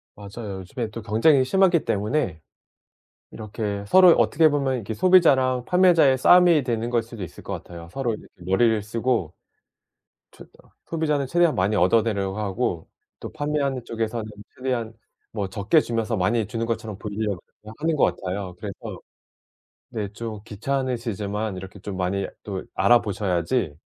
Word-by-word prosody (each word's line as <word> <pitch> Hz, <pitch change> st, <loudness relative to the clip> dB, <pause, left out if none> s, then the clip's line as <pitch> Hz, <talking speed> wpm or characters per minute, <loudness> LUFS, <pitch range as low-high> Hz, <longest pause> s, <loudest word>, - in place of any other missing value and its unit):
맞아요. 100 Hz, -1 st, -7 dB
요즘에 110 Hz, +5 st, -5 dB
또 115 Hz, +2 st, -7 dB
경쟁이 130 Hz, +6 st, +3 dB
심하기 180 Hz, +1 st, +3 dB
때문에 105 Hz, -, -1 dB, 0.9 s
이렇게 105 Hz, -2 st, -5 dB
서로 185 Hz, -, +7 dB
어떻게 155 Hz, +1 st, +4 dB
보면 140 Hz, -2 st, 0 dB
이렇게 110 Hz, -2 st, -4 dB
소비자랑 130 Hz, -, +4 dB
판매자의 170 Hz, -7 st, +4 dB
싸움이 175 Hz, -1 st, +6 dB
되는 120 Hz, -1 st, -2 dB
걸 120 Hz, -1 st, +1 dB
수도 115 Hz, -4 st, -8 dB
있을 85 Hz, -, -10 dB
것 -, -, -5 dB
같아요. 85 Hz, -1 st, -9 dB
서로 135 Hz, -4 st, -2 dB
이렇게 -, -, -9 dB, 0.2 s
머리를 110 Hz, +3 st, +2 dB
쓰고 115 Hz, -6 st, -1 dB, 1.0 s
최대한 -, -, -18 dB
소비자는 150 Hz, -4 st, -1 dB
최대한 170 Hz, +1 st, +2 dB
많이 100 Hz, +3 st, +1 dB
얻어내려 100 Hz, 0 st, +2 dB
하고 100 Hz, -4 st, -2 dB, 0.3 s
또 -, -, -8 dB
판매하는 145 Hz, -4 st, -2 dB
쪽에서는 115 Hz, 0 st, -3 dB, 0.3 s
최대한 120 Hz, -4 st, -3 dB, 0.4 s
뭐 100 Hz, -3 st, -3 dB
적게 105 Hz, -, +2 dB
주면서 115 Hz, -1 st, -2 dB
많이 105 Hz, +3 st, +1 dB
주는 115 Hz, -1 st, -3 dB
것처럼 110 Hz, -3 st, -4 dB
보이려고 105 Hz, -3 st, -3 dB, 0.2 s
그냥 110 Hz, +1 st, -11 dB
하는 160 Hz, -1 st, +1 dB
것 -, -, +2 dB
같아요. 95 Hz, -1 st, -5 dB
그래서 100 Hz, 0 st, -7 dB, 0.9 s
네 105 Hz, -3 st, -4 dB
좀 110 Hz, -1 st, -6 dB
귀찮으시지만 110 Hz, -4 st, -3 dB
이렇게 95 Hz, +2 st, -9 dB
좀 95 Hz, 0 st, -7 dB
많이 95 Hz, +2 st, -1 dB, 0.2 s
또 95 Hz, -3 st, -4 dB
알아보셔야지 100 Hz, -, +1 dB
115 Hz, 350 characters per minute, -24 LUFS, 100-130 Hz, 1.0 s, 서로